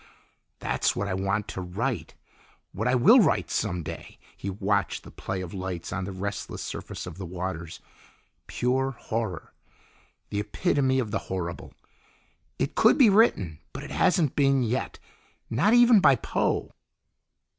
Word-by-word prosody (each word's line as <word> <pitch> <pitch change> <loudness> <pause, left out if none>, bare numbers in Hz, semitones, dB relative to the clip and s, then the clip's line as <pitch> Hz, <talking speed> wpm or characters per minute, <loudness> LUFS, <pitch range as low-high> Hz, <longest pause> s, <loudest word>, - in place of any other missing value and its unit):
"That's - - 0
what 100 - -2
I 95 - -2
want 100 +2 -1
to 95 - -5
write 110 +8 -3 0.6
what 110 +6 -2
I 125 - +3
will 205 - +7
write 190 - +2
some 90 -5 -1
day." - - -8 0.2
He 100 - -5
watched 100 0 -1
the - - -12
play 95 -1 -4
of 90 -2 -7
lights 95 -3 -5
on 95 0 -2
the 95 - -5
restless 100 +2 -5
surface - - -6
of 90 0 -9
the 95 - -5
waters. 90 -2 -5 0.7
"Pure 130 +2 0
horror, 110 -7 -4 0.8
the 100 - -1
epitome 130 - +1
of 115 -5 -1
the 115 - 0
horrible. 85 -2 -5 0.8
It - - -1
could - - +5
be 235 -6 +7
written, 95 - +3
but - - -6
it - - -9
hasn't 170 -7 +2
been 135 -2 +3
yet; 120 +3 -2 0.5
not 200 - +3
even 240 -2 +7
by 140 -7 +6
Poe." - - -1
105 Hz, 155 wpm, -26 LUFS, 95-135 Hz, 0.8 s, will